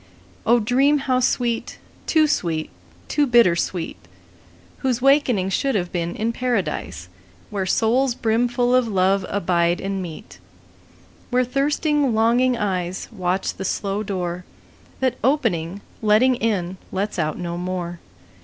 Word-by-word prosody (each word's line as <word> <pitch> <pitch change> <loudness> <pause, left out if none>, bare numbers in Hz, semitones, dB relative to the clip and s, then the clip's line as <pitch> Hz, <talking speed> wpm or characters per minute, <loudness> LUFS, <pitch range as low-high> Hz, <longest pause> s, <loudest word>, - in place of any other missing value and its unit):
O 240 +2 +5
dream 265 +6 +3
how 260 -2 +1
sweet, 240 -2 -1 0.3
too 315 -1 +4
sweet, 165 - -1 0.4
too 290 -1 +1
bitter 235 -8 +5
sweet, 170 - -3 0.8
Whose 255 -3 0
wakening 255 -8 +3
should 270 +4 0
have 180 -3 -1
been 170 -1 -2
in 225 +2 -1
Paradise, 200 - -2 0.4
Where 195 -2 -2
souls 240 +5 +2
brimful 245 +2 +1
of 255 -2 +3
love 190 -1 +1
abide 175 -3 +1
and 195 0 -3
meet; 165 -4 -9 0.9
Where 250 0 +2
thirsting 280 0 +1
longing 240 +3 +3
eyes 185 -4 -2
Watch 185 -3 -1
the - - -6
slow 195 +2 -2
door 180 -3 -3 0.6
That 255 -1 0
opening, 200 - 0 0.2
letting 220 +4 +4
in, 200 -6 -1
lets 195 0 -2
out 155 -1 -1
no 170 -1 -4
more. 175 -1 -4
215 Hz, 130 wpm, -22 LUFS, 180-250 Hz, 0.9 s, O